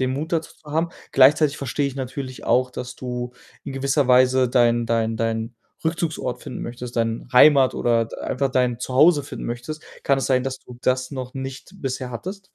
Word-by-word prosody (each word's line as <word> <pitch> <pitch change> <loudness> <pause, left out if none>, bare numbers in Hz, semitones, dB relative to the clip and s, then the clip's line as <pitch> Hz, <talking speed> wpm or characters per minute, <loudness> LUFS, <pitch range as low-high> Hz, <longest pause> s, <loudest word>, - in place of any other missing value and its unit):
den 130 0 +1
Mut 155 +5 -4
dazu 165 -1 -1
zu 150 - -12
haben. 165 +2 +1 0.2
Gleichzeitig 145 +2 +5
verstehe 140 +2 -1
ich 135 - -4
natürlich 130 0 -6
auch, 130 0 +2
dass 125 0 -6
du 125 -1 -5 0.3
in - - -6
gewisser 135 0 +1
Weise 130 0 +5
deinen 120 -1 +3
deinen 115 -1 0
deinen 115 +1 -2 0.3
Rückzugsort 160 -7 -2
finden - - -6
möchtest, 120 0 -7
dein 115 +1 -1
Heimat 135 0 +6
oder 115 -1 +2
d - - -10
einfach 135 +1 -1
dein 125 -2 +1
Zuhause 145 +5 +4
finden 140 -2 -7
möchtest. 120 +6 -5 0.2
Kann 140 -1 +3
es - - -1
sein, 130 -2 +2
dass 130 -1 -3
du 120 -1 -14
das 130 0 0
noch 130 -3 -6
nicht 135 +1 -6
bisher 130 -6 -4
hattest? 185 - -6
130 Hz, 190 wpm, -23 LUFS, 125-140 Hz, 0.3 s, Heimat